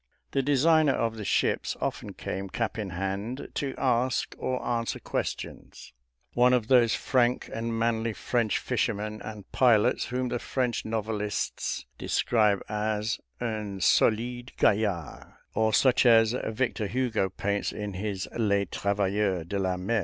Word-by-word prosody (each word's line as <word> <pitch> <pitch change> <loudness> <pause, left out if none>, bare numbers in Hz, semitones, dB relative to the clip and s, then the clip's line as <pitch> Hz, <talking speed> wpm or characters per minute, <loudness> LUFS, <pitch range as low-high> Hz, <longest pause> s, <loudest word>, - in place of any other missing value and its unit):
The 135 - +1
designer 145 +2 +4
of 115 -1 -1
the 110 - -5
ships - - 0
often - - -3
came, 95 0 -5
cap 115 +3 -2
in 105 -3 -3
hand, 100 +8 -4
to 135 -2 -3
ask 130 0 +1
or 130 0 -1
answer 115 -1 -1
questions - - -5 0.4
one 125 +1 +4
of 120 -3 +1
those 120 -3 +5
frank 125 -2 +1
and 115 0 -2
manly 115 0 0
French 115 -1 0
fishermen 110 -3 -2
and 105 -3 -9
pilots, 120 -5 +3
whom 125 0 -2
the 120 0 -2
French 125 -2 -1
novelists 110 -1 -2
describe 105 -4 +2
as 105 +1 -1 0.2
"un 110 -4 -3
solide 120 +6 +2
gaillard," 100 -7 0 0.2
or 110 0 +2
such 125 +3 +4
as 115 -1 +6
Victor 110 -1 -1
Hugo 115 -5 0
paints 100 +2 -2
in 105 -1 -5
his 95 0 -3
"Les 100 -3 +2
Travailleurs 100 -2 0
de 100 +4 -3
la 95 -1 0
Mer." 110 +5 0
110 Hz, 140 wpm, -28 LUFS, 100-120 Hz, 0.4 s, as